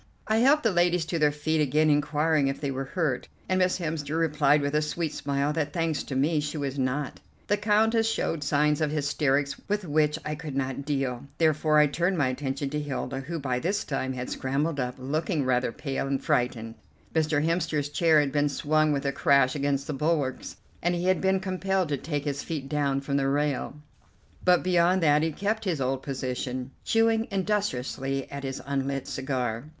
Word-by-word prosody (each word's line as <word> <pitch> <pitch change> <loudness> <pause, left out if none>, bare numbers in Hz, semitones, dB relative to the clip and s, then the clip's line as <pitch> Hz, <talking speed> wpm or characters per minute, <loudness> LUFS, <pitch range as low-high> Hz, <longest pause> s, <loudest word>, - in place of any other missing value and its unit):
I 220 - +2
helped 275 +6 +4
the 225 - +3
ladies 175 -1 +2
to 165 0 -2
their 150 -1 +4
feet 155 +2 0
again, 150 +2 +3
inquiring 150 0 +2
if 135 - -2
they 140 -2 -2
were 135 +1 -3
hurt, 145 -4 -1 0.2
and 185 0 +1
Miss 185 0 +2
Hemster 160 -3 -3
replied 150 -2 +3
with 140 0 -1
a 150 - +3
sweet 155 +1 -2
smile 140 +1 -1
that, 150 -2 -2
thanks 165 -3 0
to 135 - -5
me, 150 +4 +2
she 150 +1 -3
was 140 -1 -3
not. 130 +2 -2 0.3
The 205 - +1
Countess 225 +2 +3
showed 165 -8 -1
signs 150 +1 +2
of 155 - +2
hysterics 145 -1 +1
with 205 -1 -1
which 150 -1 +2
I 150 - -2
could 150 -2 -6
not 135 0 -2
deal, 135 -3 -2
therefore 155 -1 +3
I 150 - +7
turned 175 +6 0
my 140 -4 +2
attention 135 +1 -3
to 150 0 -1
Hilda, 135 -2 -3
who 160 +6 -5
by 130 -4 -1
this 200 +8 -1
time 130 -2 -2
had 125 0 -5
scrambled 140 +3 -1
up, 125 0 -2
looking 150 +3 -1
rather 125 -1 +1
pale 135 0 -3
and 135 -1 0
frightened. 115 -2 -1 0.4
Mr. 155 -2 +1
Hemster's 165 -4 0
chair 155 +1 +4
had 140 -2 -1
been 145 +1 +2
swung 155 +2 +1
with 140 -1 -1
a 140 - +2
crash 140 -2 +3
against 140 -1 -1
the 150 - -3
bulwarks, 145 -2 -1 0.3
and 175 +1 +1
he 175 +1 -2
had 185 0 +2
been 190 0 +2
compelled 190 -1 -1
to 145 - 0
take 145 0 -3
his 140 -1 -2
feet 150 -5 -4
down 140 -2 0
from 140 0 -1
the 135 -1 +1
rail, 145 0 0 0.7
but 180 -1 +4
beyond 180 0 +3
that 150 -1 +4
he 160 +1 0
kept 210 +7 -2
his 175 -6 0
old 130 0 -1
position, 130 -1 -4
chewing 225 0 +2
industriously 140 - -1
at 140 0 -6
his 135 -1 -4
unlit 135 -1 -2
cigar. 125 -3 -2
150 Hz, 195 wpm, -27 LUFS, 135-165 Hz, 0.7 s, I